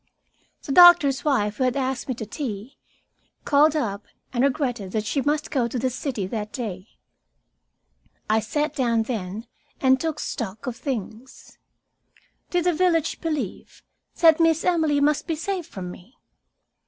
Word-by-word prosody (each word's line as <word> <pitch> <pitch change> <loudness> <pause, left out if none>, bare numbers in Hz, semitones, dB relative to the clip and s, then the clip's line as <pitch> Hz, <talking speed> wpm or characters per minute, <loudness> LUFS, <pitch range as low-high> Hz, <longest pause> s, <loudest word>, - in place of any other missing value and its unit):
The - - -5
doctor's 345 -5 +7
wife, 210 -8 +1
who - - 0
had 255 0 +1
asked 265 -1 -2
me 255 - -2
to 225 - -6
tea, 220 0 -6 0.7
called 295 +2 +4
up 210 -8 -2 0.3
and 245 0 +1
regretted 250 -8 -1
that 215 -1 -1
she 275 +6 0
must 295 +2 -1
go 255 -6 +1
to 245 - -4
the 255 +1 0
city 245 -6 -3
that 210 +2 -5
day. 205 -6 -5 1.4
I 215 +1 +3
sat 295 +7 -2
down 235 -4 +1
then 220 -2 -5 0.3
and 260 0 +4
took 320 -2 -2
stock 220 -2 -5
of 250 -3 -4
things. 245 -1 -7 0.9
Did 355 -1 0
the 355 0 +2
village 335 -2 +1
believe 300 - -4 0.4
that 325 -1 +6
Miss 325 -1 +3
Emily 320 -5 +2
must 295 +1 +1
be 325 - -1
saved 355 +1 -3
from 180 -3 -7
me? 190 +9 -15
260 Hz, 155 wpm, -24 LUFS, 220-300 Hz, 1.4 s, doctor's